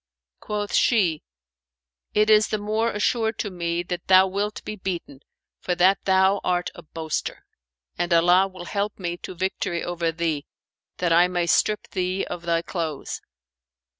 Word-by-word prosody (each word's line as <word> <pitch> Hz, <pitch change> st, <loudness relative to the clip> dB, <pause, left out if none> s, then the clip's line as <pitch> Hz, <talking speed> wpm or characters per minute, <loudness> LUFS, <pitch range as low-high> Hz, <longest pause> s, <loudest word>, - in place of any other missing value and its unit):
Quoth 205 Hz, -1 st, -4 dB
she, 185 Hz, -10 st, +3 dB, 0.9 s
"It 215 Hz, +1 st, +4 dB
is 215 Hz, 0 st, +6 dB
the 215 Hz, -, -1 dB
more 215 Hz, +2 st, 0 dB
assured 220 Hz, +2 st, 0 dB
to 205 Hz, -, -3 dB
me 170 Hz, -1 st, -2 dB
that 175 Hz, 0 st, -5 dB
thou 185 Hz, 0 st, +7 dB
wilt 200 Hz, +2 st, -3 dB
be 215 Hz, -, -4 dB
beaten, 180 Hz, -8 st, -5 dB, 0.4 s
for 180 Hz, -, -1 dB
that 185 Hz, +3 st, +3 dB
thou 190 Hz, +1 st, +3 dB
art 180 Hz, -1 st, 0 dB
a -, -, -11 dB
boaster; 160 Hz, 0 st, -4 dB, 0.5 s
and 175 Hz, 0 st, -1 dB
Allah 175 Hz, +3 st, +5 dB
will 185 Hz, -2 st, -10 dB
help 200 Hz, +3 st, -2 dB
me 175 Hz, -2 st, -3 dB
to 185 Hz, -, -8 dB
victory 185 Hz, -1 st, -2 dB
over 170 Hz, -1 st, -1 dB
thee, 160 Hz, -3 st, -2 dB, 0.5 s
that 175 Hz, -2 st, +1 dB
I 175 Hz, +2 st, +6 dB
may 175 Hz, -1 st, -1 dB
strip 210 Hz, +5 st, +2 dB
thee 185 Hz, 0 st, -1 dB
of 175 Hz, -, -6 dB
thy 165 Hz, 0 st, +1 dB
clothes. 160 Hz, -6 st, -4 dB
180 Hz, 160 wpm, -24 LUFS, 170-205 Hz, 0.9 s, thou